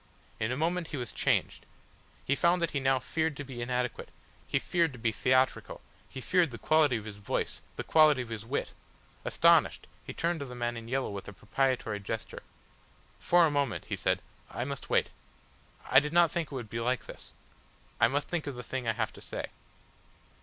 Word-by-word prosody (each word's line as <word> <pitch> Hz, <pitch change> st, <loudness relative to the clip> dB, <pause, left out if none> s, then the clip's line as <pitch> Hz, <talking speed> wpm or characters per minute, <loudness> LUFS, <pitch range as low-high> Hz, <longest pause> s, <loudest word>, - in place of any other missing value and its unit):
In 110 Hz, +2 st, 0 dB
a 130 Hz, -, -1 dB
moment 170 Hz, +2 st, 0 dB
he 150 Hz, -, -5 dB
was 120 Hz, -2 st, -4 dB
changed. -, -, 0 dB, 0.6 s
He 140 Hz, -, +2 dB
found 170 Hz, +4 st, +3 dB
that 170 Hz, -2 st, 0 dB
he 140 Hz, -, 0 dB
now 135 Hz, 0 st, +3 dB
feared 155 Hz, +4 st, -1 dB
to 145 Hz, -, -4 dB
be 130 Hz, -3 st, -7 dB
inadequate, 125 Hz, 0 st, -2 dB, 0.4 s
he -, -, +1 dB
feared 170 Hz, -5 st, +1 dB
to -, -, -9 dB
be 115 Hz, 0 st, 0 dB
theatrical, 130 Hz, +3 st, +1 dB, 0.3 s
he 130 Hz, -, -7 dB
feared 175 Hz, +3 st, +3 dB
the 120 Hz, -, -8 dB
quality 150 Hz, -2 st, +3 dB
of 110 Hz, -, -8 dB
his 105 Hz, -2 st, -8 dB
voice, 100 Hz, -, -2 dB
the -, -, -4 dB
quality 150 Hz, -5 st, +5 dB
of 120 Hz, -, -12 dB
his 110 Hz, -2 st, -5 dB
wit; 130 Hz, +5 st, -3 dB, 0.5 s
astonished, -, -, +4 dB, 0.2 s
he -, -, -7 dB
turned 170 Hz, 0 st, -1 dB
to 140 Hz, -, -4 dB
the 125 Hz, -, -8 dB
man 120 Hz, 0 st, -2 dB
in 115 Hz, 0 st, -7 dB
yellow 130 Hz, 0 st, -1 dB
with 100 Hz, -1 st, -7 dB
a 105 Hz, -, -8 dB
propitiatory 115 Hz, 0 st, -1 dB
gesture. 110 Hz, +3 st, -5 dB, 0.8 s
"For 175 Hz, -1 st, +5 dB
a 155 Hz, -, +1 dB
moment," 140 Hz, -6 st, -1 dB
he -, -, 0 dB
said, -, -, 0 dB, 0.3 s
"I 120 Hz, -, -3 dB
must 140 Hz, -1 st, -6 dB
wait. -, -, +2 dB, 0.8 s
I 135 Hz, -, +9 dB
did 150 Hz, +2 st, -4 dB
not 170 Hz, -2 st, +5 dB
think 170 Hz, -2 st, -1 dB
it -, -, -5 dB
would 120 Hz, -4 st, -5 dB
be 115 Hz, -, -2 dB
like 125 Hz, +2 st, 0 dB
this. -, -, -11 dB, 0.7 s
I -, -, +6 dB
must 140 Hz, +4 st, -1 dB
think 170 Hz, -4 st, -2 dB
of 140 Hz, -, -4 dB
the 125 Hz, -, -7 dB
thing 130 Hz, -2 st, -4 dB
I 115 Hz, -, +2 dB
have 110 Hz, 0 st, -2 dB
to -, -, -13 dB
say." -, -, -5 dB
130 Hz, 210 wpm, -30 LUFS, 120-155 Hz, 0.8 s, I